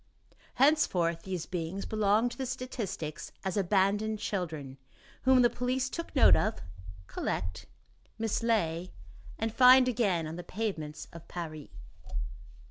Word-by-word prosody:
Henceforth 185 - +3
these 185 -3 -4
beings 180 +2 -4
belonged 215 +2 +2
to - - -9
the 265 - -2
statistics 230 - -5
as 190 - -1
"Abandoned 205 +2 +2
children," 155 -10 -4 0.5
whom 260 -1 +6
the 240 - +6
police 255 +1 -1
take 335 -1 -6
note 270 - +7
of, 215 +1 0 0.5
collect, 90 0 -4 0.5
mislay 215 -6 0 0.5
and 225 0 -2
find 255 +1 +7
again 205 -9 +1
on 160 +2 -6
the 175 - -6
pavements 175 -7 -4
of 170 -1 -11
Paris. 155 -4 -6
200 Hz, 125 wpm, -30 LUFS, 165-240 Hz, 0.5 s, note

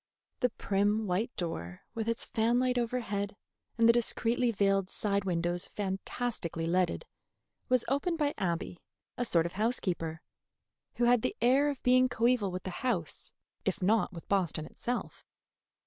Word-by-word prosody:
The 250 - +3
prim 205 +1 0
white 195 +5 0
door, 90 - -4
with 225 0 -2
its 230 - -1
fan 230 +1 +1
light 250 0 +2
overhead 220 -4 -2 0.4
and 230 0 +5
the 230 - +7
discreetly 240 +1 +1
veiled 195 -3 +2
side 200 -1 -1
windows 175 -1 -1
fantastically 195 -3 -3
leaded, 180 - +1 0.6
was 255 -2 +4
opened 285 +6 0
by 295 -2 +1
Abby, 175 -2 -2 0.4
a 245 - -1
sort 170 -8 +3
of 170 - -4
housekeeper, 185 -7 -1 0.7
who 240 - 0
had 240 -1 +5
the - - -1
air 265 +5 +4
of 280 -3 -5
being 255 +1 +5
coeval 235 -3 +2
with 185 0 -5
the 185 - -4
house, 210 -11 0 0.3
if 195 0 -1
not 215 +3 +3
with 170 -3 -10
Boston 175 -6 0
itself. 245 +8 -4
210 Hz, 150 wpm, -31 LUFS, 185-245 Hz, 0.7 s, the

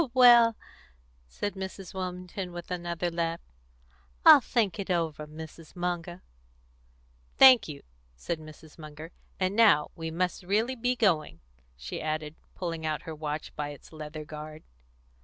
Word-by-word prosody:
"Well," 240 -3 +7 0.7
said 130 - -4
Mrs. 190 -1 -7
Wilmington, 180 0 -5
with 175 +1 -8
another 175 -1 -2
laugh, 165 0 -2 0.9
"I'll 280 - +10
think 220 -4 0
it 195 - -4
over, 160 -4 -1
Mrs. 160 +1 -11
Munger." 175 0 -4 1.1
"Thank 255 -6 +8
you," 145 -3 -8 0.3
said 160 - -4
Mrs. 155 0 -14
Munger. 155 +1 -10 0.3
"And 185 +1 0
now 205 -10 +5
we 165 -1 -5
must 180 +2 -2
really 215 +8 0
be 245 +1 0
going," 180 -10 +1 0.4
she 60 +1 -6
added, 155 -1 -3 0.2
pulling 165 -3 -4
out 155 -1 -2
her 160 - -6
watch 155 0 -5
by 150 -1 -3
its 145 +2 -12
leathern 155 0 -7
guard. 155 +1 -9
170 Hz, 140 wpm, -28 LUFS, 155-190 Hz, 1.1 s, I'll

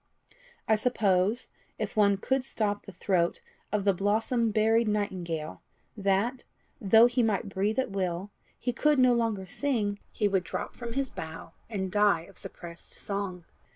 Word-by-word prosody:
I 220 - +4
suppose, 210 -1 +2 0.3
if - - -4
one 200 -2 +4
could 265 +6 0
so - - -10
stop 205 -2 -1
the - - -7
throat 180 -1 0 0.3
of 210 -1 0
the 200 0 +4
blossom 220 +5 +1
buried 220 +2 +3
nightingale, 180 -7 -2 0.3
that, 205 +5 0 0.4
though 220 +3 +7
he 245 +1 +2
might 215 -2 0
breathe 200 +4 -1
at 260 -5 0
will, 190 0 -2 0.3
he 245 - -1
could 300 +2 +3
no 255 -1 +5
longer 225 -5 0
sing, 205 -2 -1
he 210 - +1
would 195 -2 +1
drop 165 - -4
from 235 -1 -6
his 270 0 -1
bough, 160 0 -8 0.2
and 190 -4 -3
die 205 -4 +4
of 165 - -8
suppressed 170 -1 -9
song. 195 -4 -4
205 Hz, 160 wpm, -29 LUFS, 190-230 Hz, 0.4 s, though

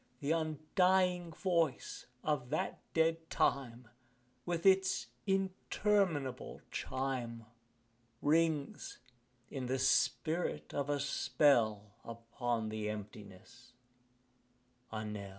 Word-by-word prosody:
The 145 +2 -1
undying 175 +3 +2
voice 165 -5 -1 0.2
of 145 -5 -1
that - - -2 0.2
dead 165 0 +2
time, 125 -3 0 0.6
With 170 0 -2
its 190 0 +4 0.2
interminable 190 -6 0
chime, 125 -4 -3 0.7
Rings, 155 -1 +1 0.5
in 130 -2 -4
the 130 +1 0
spirit 160 +5 +1
of 140 0 -2
a 145 0 +1
spell, 115 -7 +2
Upon 115 0 -3
thy 110 0 -4
emptiness 105 +3 -9 1.2
a 110 0 -4
knell. 105 -2 -5
140 Hz, 90 wpm, -34 LUFS, 115-165 Hz, 1.2 s, its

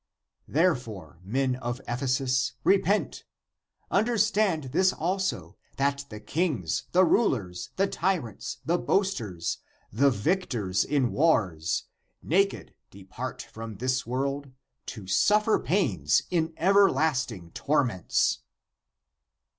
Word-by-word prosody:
Therefore, 125 - -1
men 130 +7 0
of 120 0 -4
Ephesus, 130 +1 0
re 195 - +5
pent; 200 +5 -1 0.7
understand 210 -6 +2
this 185 +3 +4
also 165 - -2 0.2
that 140 0 0
the 105 - -8
kings, 125 - -1
the 185 +1 +5
rulers, 110 - 0
the 195 - +2
tyrants, 180 - -2
the 175 +2 +1
boasters, 115 - -1 0.3
the 140 +6 +4
victors 110 - 0
in 135 -5 +1
wars, 95 - +1 0.4
naked 195 +5 0 0.2
depart 100 +6 -7
from 110 -1 -8
this 130 +4 -1
world, 140 +3 -2 0.4
to 105 -5 -7
suffer 210 - +3
pains 105 - +1
in 165 -2 +1
everlast 160 -8 +3
ing 85 -6 -10
torments 130 - +1
135 Hz, 105 wpm, -27 LUFS, 110-180 Hz, 0.7 s, re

